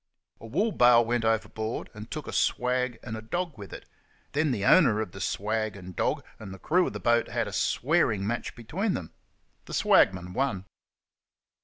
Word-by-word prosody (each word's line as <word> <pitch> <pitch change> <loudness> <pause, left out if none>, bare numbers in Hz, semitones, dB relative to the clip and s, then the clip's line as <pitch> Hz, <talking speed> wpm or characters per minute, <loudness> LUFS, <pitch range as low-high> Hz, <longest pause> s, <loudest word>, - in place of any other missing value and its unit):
A 115 - -10
wool 195 - 0
bale 120 - +5
went 120 0 0
overboard, 110 0 -2
and 105 +1 -10
took 155 -2 -5
a - - -7
swag 125 -1 0
and 110 -2 -5
a 110 - -6
dog 170 +7 -3
with 100 -4 -10
it; - - -10 0.4
then 155 +1 +1
the 105 -6 -1
owner 125 - +5
of 110 -5 -3
the 95 - -9
swag 110 +2 -1
and 90 -2 -10
dog - - 0 0.2
and 100 -3 -8
the 95 - -8
crew 175 - +2
of - - -5
the - - -5
boat 120 0 +2
had - - -2
a - - -7
swearing 125 - +1
match 120 +3 -3
between 185 - -2
them. 80 - -7 0.5
The - - -6
swagman 90 -1 +3
won. 100 -8 -1
115 Hz, 190 wpm, -27 LUFS, 105-135 Hz, 0.5 s, bale